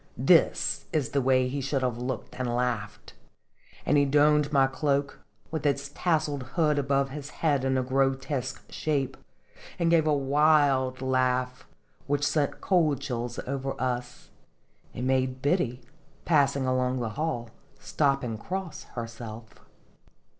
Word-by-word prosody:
This - - +3
is 150 -5 0
the 140 - 0
way 130 0 +3
he 140 +2 -3
should 135 0 -1
have 120 -2 -1
looked 125 -1 -4
and 130 -1 -1
laughed" 105 -4 -3 0.7
and 150 - +3
he 140 - +4
donned 150 +1 +3
my 135 -2 +5
cloak, 140 +1 -1 0.3
with 160 -3 -3
its 140 -1 0
tasseled 155 -5 0
hood 150 -4 +2
above 140 0 +1
his 145 0 -7
head 145 -4 0
in 135 0 +1
grotesque 135 0 -1
shape, 135 -4 -1 0.6
and 170 -1 +1
gave 160 -2 +4
a - - +3
wild 140 -2 +3
laugh, 130 -1 0 0.4
which 145 0 +1
sent 145 -3 0
cold 160 -8 +2
chills 120 -3 -4
over 135 0 -3
us, 125 -1 -4 0.6
and 125 - -3
made 130 0 +1
Biddy, 140 -5 +1 0.4
passing 140 -4 +3
along 130 0 0
the 115 -2 -2
hall, 120 -3 -3 0.3
stop 140 -2 0
and 115 -3 -4
cross 185 -2 -5
herself. 115 -1 -7
135 Hz, 140 wpm, -27 LUFS, 125-145 Hz, 0.7 s, my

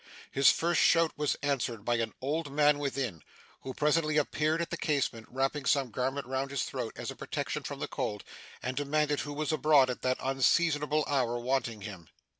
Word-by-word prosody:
His 135 +1 +6
first 170 0 +2
shout 165 -1 +4
was 150 -1 0
answered 120 -6 -1
by 120 0 +2
an 115 -1 -2
old 145 +2 -2
man 145 0 +4
within, 135 - -3 0.4
who 130 - -6
presently 155 +1 +2
appeared 155 +2 +1
at 170 - -3
the - - -1
casement, 135 -7 -1
wrapping 135 +2 -1
some 135 -4 +2
garment 130 +4 -2
round 130 +2 -2
his 140 -1 -1
throat - - -4
as - - -5
a - - -9
protection - - -3
from - - -6
the - - -3
cold, 105 -1 -3 0.4
and 130 +1 -2
demanded 145 +1 +1
who 145 - -4
was 150 +1 -2
abroad 150 -4 +4
at 125 - -6
that 130 0 +1
unseasonable 150 +3 +2
hour, 125 -4 +1
wanting 120 -3 -1
him. 95 -6 -9
140 Hz, 190 wpm, -30 LUFS, 125-150 Hz, 0.4 s, His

